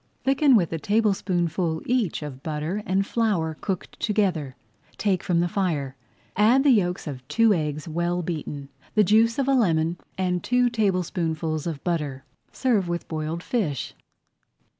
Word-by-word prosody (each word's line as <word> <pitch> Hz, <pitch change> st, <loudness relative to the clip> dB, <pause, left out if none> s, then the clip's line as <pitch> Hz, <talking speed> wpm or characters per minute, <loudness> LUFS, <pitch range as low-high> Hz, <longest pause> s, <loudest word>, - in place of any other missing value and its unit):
Thicken 270 Hz, 0 st, +4 dB
with 175 Hz, -6 st, +2 dB
a 165 Hz, -, -2 dB
tablespoonful 180 Hz, -4 st, 0 dB
each 235 Hz, -11 st, 0 dB
of 135 Hz, -3 st, -7 dB
butter 155 Hz, +6 st, -3 dB
and 190 Hz, +1 st, +1 dB
flour 200 Hz, -9 st, 0 dB
cooked 190 Hz, -3 st, -4 dB
together, 180 Hz, -, 0 dB, 0.4 s
take 195 Hz, -4 st, +1 dB
from 170 Hz, -2 st, +1 dB
the 175 Hz, -, +1 dB
fire, 160 Hz, -8 st, -1 dB, 0.4 s
add 230 Hz, +7 st, +4 dB
the 285 Hz, -, +5 dB
yolks 180 Hz, -6 st, +1 dB
of 130 Hz, -4 st, -7 dB
two 230 Hz, +4 st, +4 dB
eggs 150 Hz, -3 st, -2 dB
well 175 Hz, +2 st, -1 dB
beaten, 150 Hz, -4 st, -5 dB, 0.3 s
the 215 Hz, -, +6 dB
juice 225 Hz, +4 st, +4 dB
of 275 Hz, -1 st, 0 dB
a 275 Hz, -, +3 dB
lemon, 170 Hz, -8 st, +2 dB, 0.2 s
and 180 Hz, -2 st, 0 dB
two 245 Hz, 0 st, +2 dB
tablespoonfuls 170 Hz, -7 st, -1 dB
of 155 Hz, -5 st, -5 dB
butter. 150 Hz, -6 st, -2 dB, 0.3 s
Serve 225 Hz, -8 st, +1 dB
with 175 Hz, 0 st, -3 dB
boiled 160 Hz, +2 st, -3 dB
fish. 160 Hz, -, -2 dB
175 Hz, 150 wpm, -25 LUFS, 160-210 Hz, 0.4 s, the